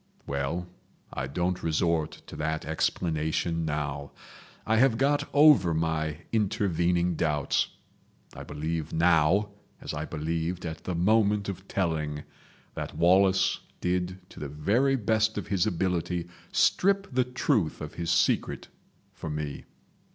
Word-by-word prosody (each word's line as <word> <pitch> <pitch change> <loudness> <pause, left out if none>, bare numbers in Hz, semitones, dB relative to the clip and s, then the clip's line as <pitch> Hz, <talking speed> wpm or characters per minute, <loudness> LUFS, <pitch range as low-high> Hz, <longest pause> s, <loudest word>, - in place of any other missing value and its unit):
Well, 70 +6 -2 0.5
I 65 0 -3
don't 90 +6 -1
resort 80 -1 0
to - - -10
that 80 +1 -2
explanation 80 +1 -1
now. 75 -2 -3 0.5
I 110 +1 +2
have 120 -1 +4
got 140 +3 +1
over 145 - +6
my 80 -1 -1
intervening 90 -5 +1
doubts. 75 -3 +1 0.7
I - - -9
believe 80 +1 -4
now, 85 +4 +3 0.3
as - - -6
I 75 +1 -3
believed 80 +2 -3
at 80 -1 -6
the 90 - -2
moment 105 +2 +2
of 95 0 -7
telling, 75 -5 -1 0.5
that - - -6
Wallace 95 +3 +4 0.2
did 90 +1 -1
to - - -11
the 75 - -5
very 110 - +2
best 110 -2 +1
of 105 - -3
his 95 -3 +2
ability 90 -1 -1 0.2
strip 195 +1 +3
the 130 0 +3
truth 125 - 0
of - - -7
his 85 -1 -4
secret 85 - +1 0.4
for 80 - -7
me. 75 -1 -4
85 Hz, 130 wpm, -28 LUFS, 80-100 Hz, 0.7 s, over